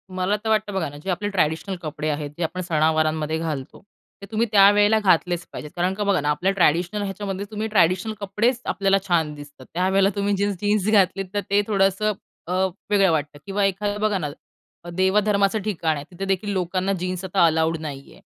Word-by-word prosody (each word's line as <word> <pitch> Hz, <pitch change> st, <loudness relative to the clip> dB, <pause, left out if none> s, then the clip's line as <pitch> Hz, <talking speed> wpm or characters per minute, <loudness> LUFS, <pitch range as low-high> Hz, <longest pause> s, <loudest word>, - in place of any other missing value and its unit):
मला 185 Hz, +2 st, +1 dB
तर 220 Hz, -, -2 dB
वाटतं 215 Hz, -1 st, +1 dB
बघा 185 Hz, -6 st, -1 dB
ना, 145 Hz, -, -11 dB
जे -, -, -5 dB
आपले 205 Hz, +3 st, -1 dB
ट्रॅडिशनल 185 Hz, 0 st, 0 dB
कपडे 155 Hz, -1 st, -4 dB
आहेत 145 Hz, -1 st, -3 dB
जे 175 Hz, -, -2 dB
आपण 180 Hz, +3 st, -3 dB
सणवारांमध्ये 155 Hz, -2 st, +1 dB
घालतो, 155 Hz, -5 st, -5 dB, 0.4 s
ते -, -, -7 dB
तुम्ही 225 Hz, +2 st, +1 dB
त्यावेळेला 205 Hz, +1 st, +6 dB
घातलेच 180 Hz, -3 st, +2 dB
पाहिजेत. 150 Hz, -, -8 dB
कारण 180 Hz, +1 st, 0 dB
का 205 Hz, +2 st, -3 dB
बघा 200 Hz, -6 st, +2 dB
ना 145 Hz, -, -1 dB
आपल्या 175 Hz, +6 st, +1 dB
ट्रॅडिशनल 180 Hz, +2 st, +2 dB
ह्याच्यामध्ये 195 Hz, 0 st, -4 dB
तुम्ही 215 Hz, +1 st, -3 dB
ट्रॅडिशनल 190 Hz, 0 st, +2 dB
कपडेच 215 Hz, +5 st, 0 dB
आपल्याला 195 Hz, 0 st, +2 dB
छान 165 Hz, -4 st, +1 dB
दिसतात. 145 Hz, -2 st, -12 dB
त्यावेळेला 190 Hz, +3 st, +2 dB
तुम्ही 200 Hz, 0 st, 0 dB
जीन्स 200 Hz, 0 st, 0 dB
जीन्स 205 Hz, -1 st, +1 dB
घातलीत 195 Hz, -2 st, +3 dB
तर 205 Hz, -, 0 dB
ते 200 Hz, +1 st, +4 dB
थोडंसं 200 Hz, +1 st, +2 dB, 0.3 s
अ, -, -, -4 dB, 0.4 s
वेगळं 195 Hz, -3 st, +4 dB
वाटतं. 150 Hz, -2 st, -2 dB
किंवा 200 Hz, 0 st, -1 dB
एखादं 205 Hz, +2 st, -1 dB
बघा 215 Hz, -2 st, +2 dB
ना, 155 Hz, -5 st, -3 dB, 0.6 s
देवधर्माचं 200 Hz, +3 st, +2 dB
ठिकाण 165 Hz, -6 st, 0 dB
आहे 145 Hz, 0 st, -6 dB
तिथे 185 Hz, +2 st, -5 dB
देखील 195 Hz, +2 st, -1 dB
लोकांना 185 Hz, +1 st, -1 dB
जीन्स 185 Hz, +1 st, -3 dB
आता 185 Hz, -1 st, +3 dB
अलाऊड 160 Hz, 0 st, +2 dB
नाही 140 Hz, -3 st, -7 dB
आहे -, -, -19 dB
190 Hz, 190 wpm, -23 LUFS, 160-205 Hz, 0.6 s, त्यावेळेला